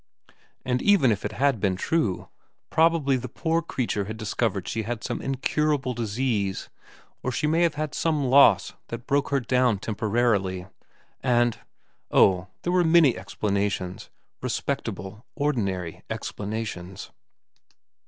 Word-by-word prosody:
And 125 0 0
even 195 - +5
if 100 - -1
it - - -3
had 135 -3 +1
been 95 -2 +1
true, 110 - -1 0.4
probably 160 -5 +3
the 125 0 -6
poor 165 +6 0
creature 120 -10 -2
had 110 +2 -6
discovered 110 -3 -1
she 115 - -2
had 115 +1 -4
some - - -3
incurable 135 0 0
disease, 110 -3 -1 0.5
or 130 - -2
she 150 - -1
may 160 +3 +2
have 170 -3 +2
had 155 -1 -3
some 155 -3 0
loss 130 -6 +5
that 115 +1 -7
broke 140 +1 +1
her 140 - +2
down 125 -3 +2
temporarily, 105 -3 0 0.6
and 120 -2 +2 0.5
oh, 95 -1 +4 0.2
there 175 - 0
were 180 -1 +4
many 160 -5 +5
explana 100 +1 -1
tions; 90 -1 -6 0.3
respectable, 100 +4 -3
ordinary 100 - -1
explanations. 100 -4 -5
120 Hz, 135 wpm, -25 LUFS, 100-140 Hz, 0.6 s, even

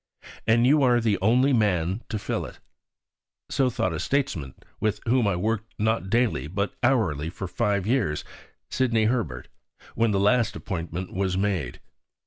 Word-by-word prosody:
And 115 +2 +4
you 145 +3 +5
are 125 -2 +4
the 110 -3 +1
only 125 +7 +4
man 95 -3 +1
to 110 - -2
fill 105 - -3
it. - - -13 0.9
So 135 -2 +2
thought 90 -7 -1
a 80 - -3
statesman 115 - -1 0.2
with 110 -1 0
whom 120 -1 +2
I 100 - +1
worked 110 +4 -2
not 110 -3 0
daily, 115 - +1
but 100 +5 -2
hourly, 95 - +1
for 95 +2 -6
five 100 0 0
years, 110 - 0 0.5
Sidney 115 -4 +2
Herbert 110 - -1 0.5
when 115 0 +2
the 100 -2 +1
last 115 +2 +2
appointment 90 -1 -5
was 95 -1 -1
made. 95 -11 -1
105 Hz, 155 wpm, -25 LUFS, 90-120 Hz, 0.9 s, you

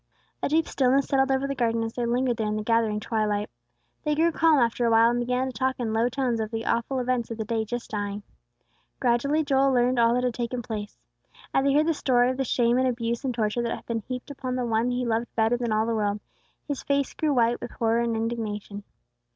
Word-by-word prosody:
A - - 0
deep 320 +2 +2
stillness 270 +1 +2
settled 270 -1 +2
over 265 0 +1
the 275 - -2
garden 230 -3 0
as 225 0 -4
they 240 -1 -2
lingered 245 0 +1
there 220 - -1
in 210 - -1
the 215 - -2
gathering 225 -1 +1
twilight. 210 -2 -1 0.5
They 300 -2 +1
grew 330 +2 +3
calm 325 -1 +4
after 240 -1 +1
awhile, 230 0 +5
and 240 - 0
began 250 +1 0
to 260 - -5
talk 260 +3 -1
in 225 -3 -2
low 230 +2 +2
tones 250 -2 -1
of 220 -1 -2
the 225 0 -4
awful 235 +3 0
events 250 -2 -1
of 230 - -5
the 220 - -3
day 220 0 -1
just 240 +2 -5
dying. 205 -1 -3 0.8
Gradually, 275 +5 +2
Joel 275 -1 +3
learned 250 0 +2
all 235 0 +4
that 250 - 0
had 250 -1 0
taken 240 +1 -3
place. 210 -2 -6 0.6
As 270 - +2
he 275 - +3
heard 305 +1 +4
the 330 - +2
story 250 -4 +2
of 260 - -5
the 270 - 0
shame 240 0 +2
and 260 - +2
abuse 235 -1 -2
and 265 - 0
torture 230 0 -1
that 235 -1 -1
had - - -12
been 230 -1 -2
heaped 250 +5 -6
upon 255 -2 -4
the 250 -1 -1
One 230 +1 +1
he 250 0 -1
loved 230 0 0
better 225 +1 +2
than 240 -2 -2
all 215 +1 +2
the 230 - -1
world, 210 -1 0 0.5
his 285 -3 -3
face 280 -1 0
grew 310 -1 0
white 240 0 +2
with - - -5
horror 230 0 0
and 235 -1 0
indignation. 215 -3 -4
240 Hz, 240 wpm, -26 LUFS, 225-260 Hz, 0.8 s, awhile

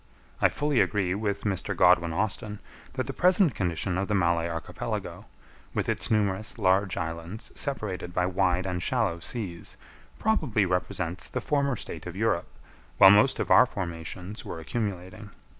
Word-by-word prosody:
I - - +6
fully 145 -3 +1
agree 95 -4 +1
with 100 0 -2
Mr. 100 -2 -1
Godwin 90 -2 +5
Austen, 105 +3 -1 0.4
that 130 -1 -2
the 135 - -4
present 180 - +4
condition 90 -1 -1
of 100 - -1
the 105 - 0
Malay 85 -2 +2
Archipelago, 80 -1 -5 0.5
with - - 0
its - - -1
numerous 105 -1 0
large 95 -1 +2
islands 85 +4 -5
separated 105 -10 -3
by 90 0 +1
wide 90 0 +1
and 90 -2 -2
shallow 105 -5 0
seas, 90 -4 -5 0.4
probably 155 - +1
represents 90 -1 -2
the - - -2
former 140 -3 0
state - - -7
of - - -7
Europe, - - 0 0.5
while 95 - +9
most 105 +6 +5
of - - -2
our - - +8
formations 90 +1 -5
were 85 - -6
accumulating. 100 +2 -4
95 Hz, 155 wpm, -27 LUFS, 90-110 Hz, 0.5 s, while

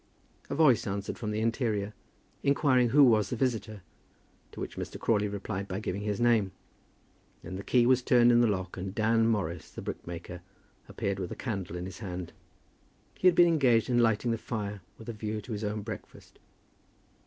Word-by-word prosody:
A - - -2
voice 140 -8 +4
answered 100 0 -4
from 110 - -3
the 105 +1 -1
interior, 110 -3 -1 0.5
inquiring 135 -3 +3
who 145 +4 +6
was 110 -6 +4
the - - -2
visitor, 110 -5 -2 0.7
to - - -11
which - - -5
Mr. - - -6
Crawley 105 -2 +1
replied 100 -1 -4
by 95 0 -3
giving 100 -2 -3
his 105 -1 -2
name. 115 -5 +3 0.9
Then 90 +2 -7
the 100 - -6
key 120 +2 +3
was 130 0 +4
turned 120 -1 +5
in 120 0 +5
the 120 - +4
lock, 95 -4 -2
and 95 +1 -5
Dan 115 0 +3
Morris, 95 -7 -1
the - - -9
brickmaker, 85 +1 -7 0.5
appeared 100 -1 -2
with 90 -2 -4
a - - -4
candle 95 -8 -4
in 90 0 -4
his 95 -2 -8
hand. 90 -4 -6 0.8
He 185 - +2
had 180 - +6
been 175 0 +7
engaged 130 -7 +3
in 120 - +3
lighting 115 0 +2
the 115 - -1
fire, 105 -4 -4 0.2
with 110 - -12
a 120 - -4
view 105 0 -4
to 115 - -10
his 105 0 -3
own 105 0 -2
breakfast. 110 0 -10
110 Hz, 190 wpm, -29 LUFS, 100-120 Hz, 0.9 s, been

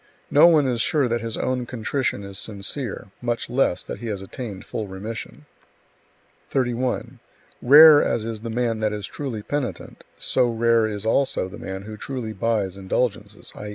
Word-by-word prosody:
No 150 +4 +7
one 155 -4 +5
is 120 -3 0
sure 145 0 +2
that 120 -1 -1
his 115 -1 -4
own 125 -1 -1
contrition 125 -2 -2
is 100 0 -7
sincere; 105 +1 -4
much 120 -1 -2
less 125 -8 +1
that - - -7
he 120 - -6
has 100 -3 -4
attained 100 -2 -7
full 110 - -4
remission. 105 +4 -7 1.0
31. 125 -1 -1 0.4
Rare 150 +3 +9
as 110 - -1
is 115 -2 -5
the 115 - -5
man 115 -1 -1
that 110 -1 0
is 105 -2 -4
truly 120 -6 -5
penitent, 125 - -4
so 125 - +2
rare 115 -1 +2
is 105 -1 -4
also 115 -4 +1
the 100 +3 -10
man 95 0 -6
who 110 +1 -8
truly 120 -1 -5
buys 100 -3 -1
indulgences, 105 +1 -2
i. 105 - -7
115 Hz, 170 wpm, -23 LUFS, 105-125 Hz, 1.0 s, Rare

